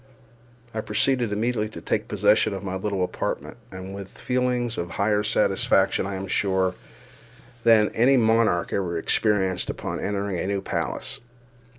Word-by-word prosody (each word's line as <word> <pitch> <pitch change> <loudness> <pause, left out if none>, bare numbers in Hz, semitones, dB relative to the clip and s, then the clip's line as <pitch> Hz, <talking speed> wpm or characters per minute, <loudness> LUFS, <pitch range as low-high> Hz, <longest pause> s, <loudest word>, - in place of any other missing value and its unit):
I 110 - -2
proceeded 120 +2 +1
immediately 110 +1 0
to - - -9
take - - -2
possession 105 -2 +3
of 95 - -6
my 95 -1 -4
little 95 -1 -1
apartment, 90 - -3
and 95 0 -8
this - - -7
with 100 -1 -9
feelings 125 -2 0
of 85 - -3
higher 105 +3 +1
satisfaction, 100 -2 +2
I 100 - -4
am 95 +1 -4
sure, 95 -1 +1 0.9
than 110 -2 +5
any 130 +4 +4
monarch 110 -6 +2
ever 90 -4 -1
experienced 95 0 +1
upon - - -4
entering 100 -2 -2
a - - -2
new 100 0 0
palace. - - -3
100 Hz, 155 wpm, -25 LUFS, 95-110 Hz, 0.9 s, than